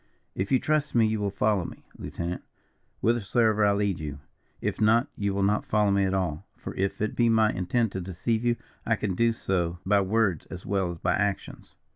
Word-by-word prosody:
"If 95 +1 -3
you 130 - +6
trust 150 +1 0
me 115 -2 +5
you 110 0 0
will 100 -1 0
follow 100 -1 +1
me, - - -9
lieutenant, 85 +1 -5 0.6
whithersoever 110 -1 +2
I 100 - +5
lead 100 -3 0
you. 75 -2 -5 0.4
If - - -3
not, 115 +3 +5
you 100 -1 -1
will 100 0 0
not 105 +2 +2
follow 105 -1 +2
me 100 0 +3
at 95 - 0
all, 90 -1 -2
for - - -7
if 100 +2 -1
it 110 - -2
be 120 -1 +3
my 110 -1 +4
intent 100 +5 0
to 95 - -4
deceive 95 +6 -2
you, 120 -1 +2 0.3
I - - +2
can 100 -3 -2
do 115 +5 +3
so 90 -6 -1
by 100 +1 +4
words 100 -3 +1
as 90 0 -9
well 95 -2 0
as 85 - -5
by - - 0
actions. 100 -1 -3
100 Hz, 210 wpm, -27 LUFS, 95-110 Hz, 0.6 s, you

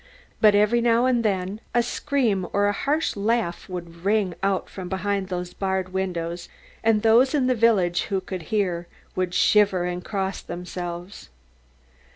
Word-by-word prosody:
But 210 -2 +6
every 210 +3 +3
now 235 +1 +3
and 245 -2 +2
then 195 0 -1
a 240 - +4
scream 235 -7 0
or 200 0 +3
a 205 - +3
harsh 290 +9 0
laugh 210 -4 -1
would 170 -2 -8
ring 200 -2 +1
out 195 -1 0
from 185 -2 -8
behind 195 +1 -1
those 180 -1 -4
barred 190 -1 -2
windows, 175 -2 -3 0.3
and 220 -1 +3
those 240 +6 +5
in 275 -3 +2
the 255 - +3
village 210 -7 +2
who 195 -3 -1
could 185 -1 -6
hear, 180 -5 0 0.3
would 180 -1 -1
shiver 205 -4 +4
and 180 0 -3
cross 195 -1 -3
themselves. 175 - -7
195 Hz, 160 wpm, -24 LUFS, 180-220 Hz, 0.3 s, But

